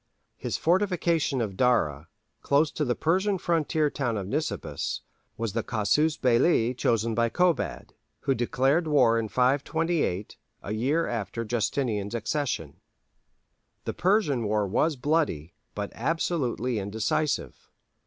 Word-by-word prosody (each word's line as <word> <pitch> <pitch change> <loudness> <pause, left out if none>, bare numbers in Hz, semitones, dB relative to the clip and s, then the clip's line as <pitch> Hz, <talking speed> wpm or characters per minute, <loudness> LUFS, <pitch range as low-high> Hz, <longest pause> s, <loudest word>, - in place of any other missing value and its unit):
His - - -3
fortification 170 -6 +1
of 105 -4 -3
Dara, 85 - +1 0.3
close 145 +2 +2
to 150 - -2
the 125 -4 0
Persian 190 +5 +1
frontier 160 -3 +1
town 120 -5 -1
of 100 - -3
Nisibis, 150 +10 -3 0.4
was 115 -3 -3
the 115 - 0
casus 125 +9 +1
belli 125 -1 +3
chosen 115 -2 0
by 115 +1 +2
Kobad, 180 +4 0 0.3
who 135 - +1
declared 135 +6 +1
war 125 -6 +4
in 110 - -2
528, 140 - 0 0.3
a 100 - -5
year 140 +9 +1
after 115 0 -3
Justinian's 110 -2 -1
accession. 115 - -2 1.1
The - - -2
Persian 180 - +2
war 105 0 +1
was 150 - +1
bloody, 125 - 0 0.2
but 105 -1 -4
absolutely 130 -4 -1
indecisive. 110 +9 -2
125 Hz, 125 wpm, -27 LUFS, 110-155 Hz, 1.1 s, war